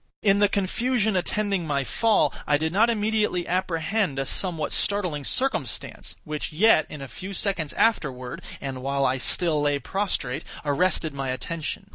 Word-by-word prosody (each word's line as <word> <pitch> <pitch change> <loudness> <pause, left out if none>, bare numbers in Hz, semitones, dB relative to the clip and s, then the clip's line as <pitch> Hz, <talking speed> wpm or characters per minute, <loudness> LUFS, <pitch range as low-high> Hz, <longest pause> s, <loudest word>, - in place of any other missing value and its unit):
In 200 -1 +4
the 205 -1 +4
confusion 220 +3 0
attending 195 -1 0
my 140 -2 0
fall, 225 - +2
I 145 - +4
did 160 +2 -2
not 220 +5 +4
immediately 210 -5 0
apprehend 180 -1 0
a 135 - 0
somewhat 165 0 -1
startling 180 -8 0
circumstance, 265 - 0
which 150 +1 -4
yet, 175 +1 +4
in 150 -2 -7
a - - -7
few 190 +8 -8
seconds 175 -6 0
afterward, 130 - 0 0.2
and 135 -2 -5
while 140 +1 0
I 130 0 +1
still 160 +2 +2
lay 145 -1 +2
prostrate, 140 -4 -2 0.2
arrested 160 +1 +1
my 135 -1 -3
attention. 160 +7 -4
170 Hz, 155 wpm, -25 LUFS, 145-205 Hz, 0.2 s, In